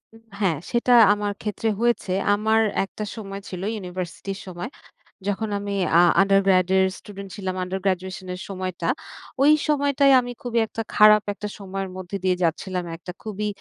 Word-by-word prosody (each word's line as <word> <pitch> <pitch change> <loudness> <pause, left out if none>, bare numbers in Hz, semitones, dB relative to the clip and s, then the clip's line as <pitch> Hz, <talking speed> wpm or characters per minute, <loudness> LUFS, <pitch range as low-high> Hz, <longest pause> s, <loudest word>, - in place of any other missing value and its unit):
উম 225 - -17 0.2
হ্যাঁ, 185 -7 +1
সেটা 240 +1 +1 0.2
আমার 205 0 -2
ক্ষেত্রে 215 +1 -2
হয়েছে। 235 -5 +1 0.2
আমার 220 +2 +2 0.2
একটা 195 +2 -6
সময় 200 -3 -7
ছিল, 180 -1 -6
ইউনিভার্সিটির 185 0 -6
সময়। 180 +5 -6 0.6
যখন 210 +2 -1
আমি 200 0 -4 0.2
আ - - +7 0.2
undergrade 195 -2 +3
এর 190 - +5 0.2
স্টুডেন্ট 200 -1 -10
ছিলাম 185 -2 -4
under 185 +1 -3
graduation 185 0 -2
এর - - -9
সময়টা। 185 -3 -4 0.5
ওই 290 +2 +7 0.2
সময়টায় 280 -1 +3
আমি 245 0 -4
খুবই 240 -1 0
একটা 225 - -5
খারাপ 210 0 +7
একটা 210 +1 -6
সময়ের 195 -1 -5
মধ্যে 185 +1 -5
দিয়ে 185 -1 +2
যাচ্ছিলাম। 180 +2 -1
একটা 180 +2 -8
খুবই 210 -1 -3
195 Hz, 160 wpm, -23 LUFS, 185-215 Hz, 0.6 s, আ